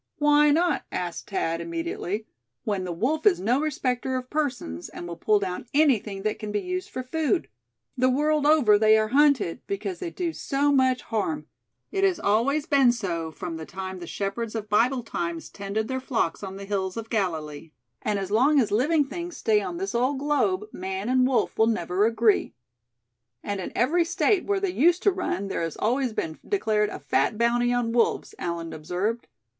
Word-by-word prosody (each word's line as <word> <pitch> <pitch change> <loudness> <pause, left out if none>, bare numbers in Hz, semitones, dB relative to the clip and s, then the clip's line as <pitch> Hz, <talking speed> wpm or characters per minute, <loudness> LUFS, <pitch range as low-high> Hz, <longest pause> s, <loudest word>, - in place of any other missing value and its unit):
"Why 295 0 +5
not?" 340 +4 +2
asked 175 -2 -4
Thad, 165 -4 -1
immediately; 170 +5 -3 0.4
"when 200 -4 -2
the 180 - -3
wolf 275 - 0
is 390 - +4
no 245 +8 +1
respecter 260 -4 -1
of 255 0 -7
persons, 255 - -3
and 175 - -8
will 170 - -5
pull 210 +5 +2
down 190 +3 -4
anything 225 -10 +2
that 215 0 -1
can 210 -1 -5
be 205 - 0
used 365 - -4
for 255 - -5
food? 320 +6 0 0.5
The 255 0 +3
world 295 +2 +2
over, 250 -10 +5
they 220 0 +6
are 215 0 +1
hunted, 270 - +3
because 395 -2 -3
they 360 - -4
do 335 -1 -3
so 285 -1 0
much 260 -2 +2
harm. 235 +8 -2 0.5
It 390 0 -1
has 380 -3 +3
always 265 +9 +1
been 275 -6 +5
so 175 -9 -3
from 165 +1 -6
the 160 - -7
time 190 0 -6
the 175 - -8
shepherds 215 +5 -3
of 215 -1 -4
Bible 245 +4 +2
times 340 +5 -4
tended 200 +2 -3
their 260 0 -2
flocks 230 -10 -1
on 190 -1 -6
the 200 - -7
hills 195 -1 -2
of 225 0 -6
Galilee. 160 -7 -2 0.3
And 210 -1 0
as 195 0 -4
long 275 +7 +4
as 230 - +1
living 290 +8 +3
things 345 +5 -6
stay 215 -2 +2
on 335 - -4
this 390 +2 -3
old 255 +4 +1
globe, 265 -9 +1
man 190 +3 -4
and 255 0 +4
wolf 260 -4 0
will 220 - +5
never 195 -1 +1
agree." 225 -2 +2 0.9
"And 205 -1 -3
in - - -5
every 330 +8 +2
State 385 +3 +1
where 405 -1 +1
they 390 -2 -1
used 350 +2 +3
to 405 - +5
run, 360 - -2
there 195 - -2
has 165 -2 -3
always 250 +3 0
been 160 -7 -4
declared 215 - +1
a - - -6
fat 215 - 0
bounty 240 +1 +2
on 245 -2 0
wolves," 235 0 +1
Allan 170 -1 -4
observed. 180 +9 -3
235 Hz, 195 wpm, -26 LUFS, 195-290 Hz, 0.9 s, they